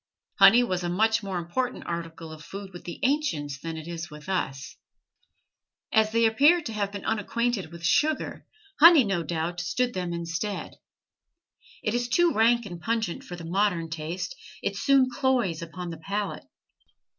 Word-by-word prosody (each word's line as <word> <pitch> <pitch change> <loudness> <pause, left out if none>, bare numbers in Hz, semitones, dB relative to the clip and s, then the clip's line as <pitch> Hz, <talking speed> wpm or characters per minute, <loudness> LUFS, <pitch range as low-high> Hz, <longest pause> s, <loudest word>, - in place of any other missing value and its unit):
Honey 210 +5 +8
was 185 -6 -2
a 175 - -1
much 220 +5 +2
more 195 -3 -4
important 210 +10 -3
article 165 -1 -5
of 155 -1 -10
food 195 +2 -8
with 175 - -10
the 175 - -6
ancients 165 - 0
than 165 +2 -5
it 160 0 -8
is 170 0 -5
with 150 +3 -11
us. 135 -8 -3 1.2
As 220 -1 +4
they 230 +1 +3
appear 285 +10 +5
to 255 -9 -6
have 200 -2 -2
been 200 -1 -7
unacquainted 220 -3 -1
with 170 0 -11
sugar, 305 - +1 0.3
honey, 330 -3 +9
no 195 -5 0
doubt, 170 +1 -3
stood 245 +8 -1
them 180 -2 -3
instead. 170 +4 -4 1.1
It 215 - 0
is 240 0 -1
too 345 +5 +3
rank 235 +1 +3
and 175 -4 -8
pungent 225 -5 -2
for 175 - -8
the 170 -1 -9
modern 175 -2 0
taste; 165 - -4 0.3
it - - -1
soon 275 -2 +4
cloys 245 - 0
upon 170 +1 -6
the 165 - -7
palate. 200 +4 -3
195 Hz, 170 wpm, -26 LUFS, 170-235 Hz, 1.2 s, honey